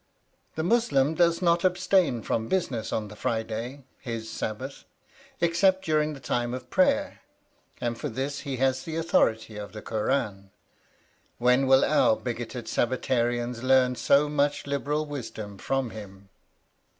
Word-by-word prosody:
The 160 - -2
Muslim 165 - +2
does 170 +1 +2
not 170 0 +3
abstain 180 - +2
from 110 0 -1
business 125 - -1
on 105 -1 -2
the 105 - -10
Friday, 115 +5 -3 0.2
his 115 -3 -5
Sabbath, 130 +6 -5 0.6
except 185 +3 +2
during 155 -1 +1
the - - -10
time 120 -1 -1
of 125 0 -9
prayer, 280 +1 +2 0.6
and 120 -1 -2
for - - -4
this 135 +4 -3
he 140 -3 -4
has 130 0 +1
the 160 +3 -6
authority 110 -9 +1
of 105 0 -7
the 105 - -7
Kur 110 -1 -2
ân: 100 -8 -1 0.9
when 125 +2 +3
will 135 0 +6
our 150 -7 +4
bigoted 120 0 -5
Sabbatarians 120 -1 0
learn 130 -1 +4
so 140 +3 +3
much 145 0 0
liberal 145 +2 -1
wisdom 110 -8 -7
from 135 0 -1
him? 100 -2 -11
130 Hz, 145 wpm, -27 LUFS, 115-150 Hz, 0.9 s, will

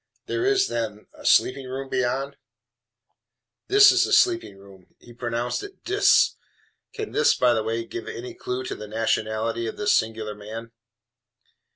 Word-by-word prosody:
"There 365 +2 -1
is, 395 -1 +3
then, 110 -2 -4
a - - -15
sleeping 130 0 +3
room 135 +1 -5
beyond?" 130 +2 -1 1.3
"This 410 +1 +7
is - - +3
the - - -2
sleeping 350 - +3
room." 95 -2 -18
(He 120 - -16
pronounces 120 0 -3
it 405 -1 -11
DIS. 400 +1 +3 0.6
Can 430 -2 -5
this, 465 +2 +3
by 125 -1 +3
the 110 - 0
way, 115 +1 -3
give 115 - -7
any 125 +2 -7
clew 125 +1 -4
to - - -4
the 105 - -8
nationality 110 +1 -1
of - - -6
this 210 0 +2
singular 110 -1 -1
man?) 110 +3 -9
120 Hz, 160 wpm, -24 LUFS, -, 1.3 s, This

